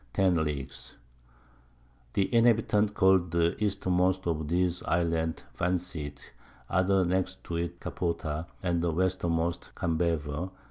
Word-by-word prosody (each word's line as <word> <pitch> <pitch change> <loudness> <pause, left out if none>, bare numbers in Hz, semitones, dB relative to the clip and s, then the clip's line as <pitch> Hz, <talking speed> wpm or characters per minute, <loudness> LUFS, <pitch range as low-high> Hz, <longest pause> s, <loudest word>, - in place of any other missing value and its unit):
10 90 -4 +3
Leagues. 70 -4 -5 1.2
The 100 +4 0
Inhabitants 110 -3 +3
call'd 95 -3 +4
the 85 +1 +2
Eastermost 95 -2 +1
of 80 -3 -1
these 90 +1 +1
Islands 85 -1 0
Vanseat, 85 -5 -3 0.4
the - - -12
other 95 0 +3
next 90 +1 -1
to 85 - -4
it 85 -1 -3
Capota, 85 -2 -3 0.2
and 85 -2 +1
the 85 -1 +1
Westermost 85 -1 0
Cambaver. 80 -2 -1
S. - - -8
85 Hz, 125 wpm, -29 LUFS, 80-95 Hz, 1.2 s, call'd